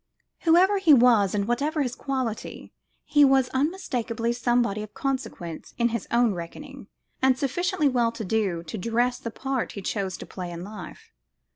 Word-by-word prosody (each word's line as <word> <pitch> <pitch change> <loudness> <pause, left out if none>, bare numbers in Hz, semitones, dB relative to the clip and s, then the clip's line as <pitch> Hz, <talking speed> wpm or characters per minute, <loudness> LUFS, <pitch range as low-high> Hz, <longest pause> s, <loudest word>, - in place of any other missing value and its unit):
Whoever 370 +4 +4
he 325 -7 +7
was 230 -6 +4
and 200 0 0
what 240 0 +1
his 290 -3 -1
quality, 260 -5 -4 0.3
he 295 -1 +4
was 265 -2 +4
unmistakably 255 -7 -1
somebody 240 -3 +1
of 215 0 -9
consequence 260 - -4
in 235 0 +2
his 235 -3 -4
own 235 -2 +3
reckoning, 235 - -8 0.3
and 260 -1 +4
sufficiently 300 +3 0
well 240 -3 +2
to 225 -2 -5
do 190 -5 0
to 170 +6 -6
dress 240 +5 0
the 230 - -5
part 265 +2 -3
he 200 - -6
chose 190 -3 -2
to - - -8
play 180 -2 -7
in 170 0 -7
life. 210 +2 -10
240 Hz, 165 wpm, -25 LUFS, 210-270 Hz, 0.3 s, he